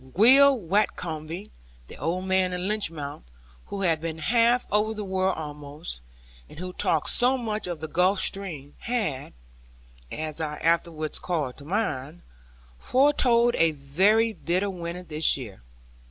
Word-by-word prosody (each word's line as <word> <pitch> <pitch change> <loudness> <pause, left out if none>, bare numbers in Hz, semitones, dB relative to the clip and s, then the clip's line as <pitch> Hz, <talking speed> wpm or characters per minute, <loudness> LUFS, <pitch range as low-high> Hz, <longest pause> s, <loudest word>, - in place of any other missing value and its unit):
Will 270 +7 +7
Watcombe, 175 -2 -2 0.3
the - - -12
old 175 +6 -2
man 190 -1 +1
at 180 - -3
Lynmouth, 175 -7 -3 0.5
who 200 - -5
had 165 -5 +1
been 165 -1 -4
half 235 +8 +2
over 215 +1 +1
the 210 - -4
world 190 -1 0
almost, 150 - -7 0.5
and - - -14
who 180 +2 -6
talked 160 -4 +2
so 255 +2 +4
much 215 -5 -3
of 170 -3 -5
the 160 - -4
Gulf 180 +5 +2
stream, 165 -10 -2
had 205 - -3 0.8
(as 155 0 -4
I 150 -1 -3
afterwards 165 -2 0
called 150 -8 -3
to 140 - -12
mind) 160 -5 -3 0.6
foretold 250 -3 +3
a 165 -1 +3
very 195 +11 +2
bitter 185 +2 -1
winter 175 0 -6
this 155 -3 +3
year. 110 - -9
180 Hz, 140 wpm, -26 LUFS, 155-210 Hz, 0.8 s, Will